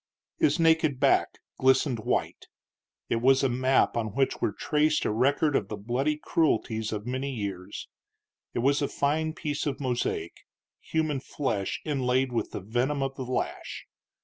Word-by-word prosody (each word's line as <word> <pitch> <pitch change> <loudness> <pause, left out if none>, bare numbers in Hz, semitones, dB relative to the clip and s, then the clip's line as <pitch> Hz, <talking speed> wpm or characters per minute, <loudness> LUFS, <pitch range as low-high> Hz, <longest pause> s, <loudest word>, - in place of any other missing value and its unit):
His 315 - +3
naked 160 -4 +3
back - - +3 0.2
glistened 130 -1 +3
white. 110 - -2 0.6
It - - 0
was 130 +3 +4
a 135 - +3
map 130 +2 +2
on 110 -2 -2
which 135 -1 +1
were - - +1
traced 150 +7 +1
a - - +1
record 140 +6 +2
of 100 - +1
the 105 - -5
bloody 125 +8 -1
cruelties 110 -9 0
of 105 -1 -4
many 130 +3 -2
years; 100 -6 -5 0.7
it 120 - 0
was 140 +2 +3
a 140 - +1
fine 155 +3 0
piece 150 -2 -3
of 140 - -2
mosaic 120 - -2 0.4
human 155 -3 -1
flesh 110 -8 -2
inlaid 130 -3 +1
with 120 - -1
the - - -6
venom 125 +8 0
of 135 0 -2
the 135 - -7
lash. 125 +1 -3
130 Hz, 160 wpm, -27 LUFS, 115-145 Hz, 0.7 s, was